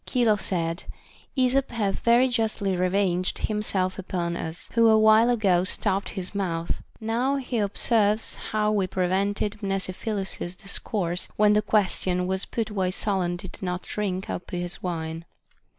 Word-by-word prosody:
Chilo 235 -4 +3
said: 170 -4 -1 0.5
Esop 260 +1 +2
hath 210 -5 -1
very 240 +2 +4
justly 220 -5 0
revenged 185 0 +1
himself 200 -3 -1
upon 175 -2 -2
us, 160 0 -6
who 230 -1 +5
awhile 220 +1 +6
ago 195 -7 +3
stopped 195 +1 -1
his 190 -1 -5
mouth; 170 -4 -2 0.2
now 235 +5 0
he 255 -3 -2
observes 210 +1 +2 0.2
how 215 0 +1
we 200 -3 +1
prevented 200 +3 -1
Mnesiphilus's 195 -1 -3
discourse, 180 -2 -1
when 210 0 +4
the 210 - +4
question 185 -3 +2
was 190 +1 -1
put 225 -2 -3
why 190 -3 0
Solon 185 -2 -1
did 175 +1 -7
not 180 -1 -3
drink 190 -3 -3
up 180 - -5
his 175 -1 -4
wine. 165 -2 -4
195 Hz, 140 wpm, -25 LUFS, 180-215 Hz, 0.5 s, awhile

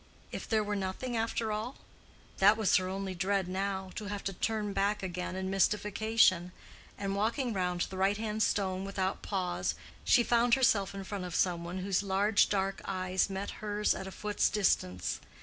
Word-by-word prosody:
If - - -6
there 220 -2 +2
were 205 0 -2
nothing 200 +6 -3
after 225 0 -1
all? 220 +5 -3 0.6
That 205 +3 +6
was 220 -3 +3
her 185 -1 -1
only 190 0 -3
dread 190 +1 0
now—to 190 +2 -3
have 205 0 -4
to 195 - -2
turn 210 +1 -1
back 200 +1 0
again 180 0 -4
in 190 0 -3
mystification; 205 -2 +3 0.5
and 195 -1 -2
walking 230 +4 0
round 180 -2 -1
the 190 - -2
right 195 +2 +2
hand 215 0 -2
stone 190 -3 +1
without 195 -1 -2
pause, 185 -3 -1 0.3
she 240 - +5
found 235 +1 +4
herself 215 -7 +2
in 195 - -5
front 190 -1 -5
of 175 -2 -5
some 175 -2 +1
one 175 +2 -5
whose 195 -1 +1
large 200 +2 +3
dark 195 -1 -1
eyes 185 0 0
met 195 +1 -4
hers 210 0 +1
at 190 - -6
a - - -6
foot's 210 +1 0
distance. 90 - 0
195 Hz, 180 wpm, -31 LUFS, 190-210 Hz, 0.6 s, That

